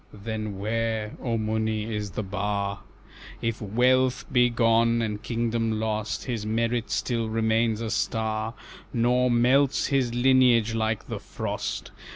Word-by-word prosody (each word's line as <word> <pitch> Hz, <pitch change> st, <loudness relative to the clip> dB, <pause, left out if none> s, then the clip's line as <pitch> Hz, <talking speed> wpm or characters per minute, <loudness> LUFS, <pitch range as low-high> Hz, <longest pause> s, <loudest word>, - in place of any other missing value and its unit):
"Then 110 Hz, -1 st, -5 dB
where, 110 Hz, +1 st, -2 dB
O 115 Hz, -2 st, -1 dB
Muni, 110 Hz, 0 st, -1 dB
is 105 Hz, -1 st, -3 dB
the 95 Hz, +4 st, -4 dB
bar? 100 Hz, 0 st, -2 dB, 0.6 s
If 115 Hz, -1 st, -2 dB
wealth 125 Hz, +4 st, +2 dB
be 125 Hz, -2 st, +4 dB
gone, 115 Hz, 0 st, +3 dB
and 105 Hz, -2 st, -2 dB
kingdom 115 Hz, -1 st, -1 dB
lost, 110 Hz, -1 st, -2 dB
His 115 Hz, -5 st, -3 dB
merit 115 Hz, +2 st, -1 dB
still 115 Hz, -3 st, -1 dB
remains 110 Hz, 0 st, +1 dB
a 110 Hz, -1 st, -3 dB
star, 110 Hz, +1 st, -1 dB, 0.4 s
Nor 125 Hz, +2 st, +2 dB
melts 130 Hz, +4 st, +3 dB
his 130 Hz, -3 st, +2 dB
lineage 120 Hz, -3 st, +4 dB
like 110 Hz, -1 st, -1 dB
the -, -, -4 dB
frost. -, -, -4 dB
115 Hz, 135 wpm, -26 LUFS, 110-120 Hz, 0.6 s, be